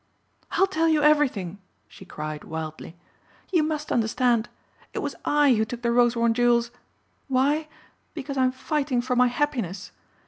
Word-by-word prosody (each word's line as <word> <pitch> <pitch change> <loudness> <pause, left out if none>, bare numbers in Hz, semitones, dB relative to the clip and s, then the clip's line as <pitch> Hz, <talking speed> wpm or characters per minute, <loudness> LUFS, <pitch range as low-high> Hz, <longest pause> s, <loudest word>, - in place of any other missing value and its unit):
"I'll 385 - +4
tell 330 -4 0
you 310 -2 +3
everything," 255 - +2 0.3
she - - -14
cried 155 0 -6
wildly. 160 +1 -7 0.6
"You 345 -4 +3
must 305 -1 -2
understand. 235 0 +1 0.5
It - - -4
was - - -3
I 290 -2 +4
who 220 -1 +2
took 235 +2 -6
the 235 - +1
Rosewarne 235 -1 +3
jewels. 235 0 +2 0.6
Why? 285 +4 +1 0.5
Because 280 -2 -5
I 260 -1 +3
am 255 - +2
fighting 270 -1 -1
for 250 0 -1
my 250 0 +5
happiness. 240 - -2
250 Hz, 150 wpm, -25 LUFS, 230-295 Hz, 0.6 s, my